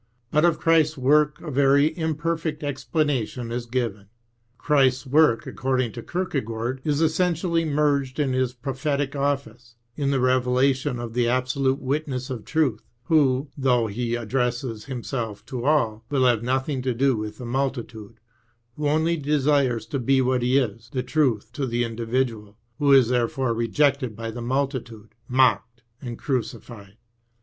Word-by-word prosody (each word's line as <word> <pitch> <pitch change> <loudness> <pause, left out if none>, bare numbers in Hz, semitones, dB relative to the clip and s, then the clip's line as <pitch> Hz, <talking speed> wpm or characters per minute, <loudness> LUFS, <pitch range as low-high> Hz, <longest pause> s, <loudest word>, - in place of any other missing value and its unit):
But 150 +2 +3
of 170 -2 +3
Christ's 160 -1 +3
work 150 +3 +3
a 160 - -6
very 140 +3 +3
imperfect 160 -1 -2
explanation 135 -4 -2
is 120 0 -4
given. 115 -5 -3 0.5
Christ's 135 -3 +2
work, 145 -3 +3
according 130 -3 -1
to 120 - -7
Kierkegaard, 130 -7 -3
is 150 0 0
essentially 165 +1 +1
merged 145 -3 0
in 135 -3 +1
His 130 -1 +1
prophetic 140 +2 -2
office, 130 -4 -3 0.2
in 140 -2 -1
the 140 -1 +1
revelation 130 +1 +2
of 120 -1 -6
the 120 0 +1
absolute 130 +2 +1
witness 135 -2 -3
of 115 -5 -6
truth, 155 -7 0 0.2
who, 135 -1 +2
though 125 -4 +2
He 115 +3 -2
addresses 120 -1 -2
Himself 120 -4 -5
to 125 -3 -5
all, 115 -7 +1
will 135 -3 +2
have 120 -3 +3
nothing 130 +2 -1
to 125 -1 -1
do 135 +1 +2
with 105 0 -5
the 125 - -8
multitude, 120 -4 -4 0.6
who 150 -1 -1
only 160 +3 +1
desires 140 -4 +1
to 140 - -3
be 135 +2 +2
what 130 -1 +1
He 125 +2 +2
is, 115 -2 -2
the 130 -2 -2
truth 130 -9 0
to 140 -3 -2
the 120 0 0
individual, 115 -1 -2
and 100 - -23 0.2
who 145 -1 +3
is 130 -4 +6
therefore 125 0 0
rejected 130 +1 +1
by 115 +1 -5
the 120 +2 -7
multitude, 120 -4 -3
mocked, 120 -2 +2 0.2
and 120 -3 -6
crucified. 115 -5 -5
130 Hz, 155 wpm, -24 LUFS, 120-145 Hz, 0.6 s, is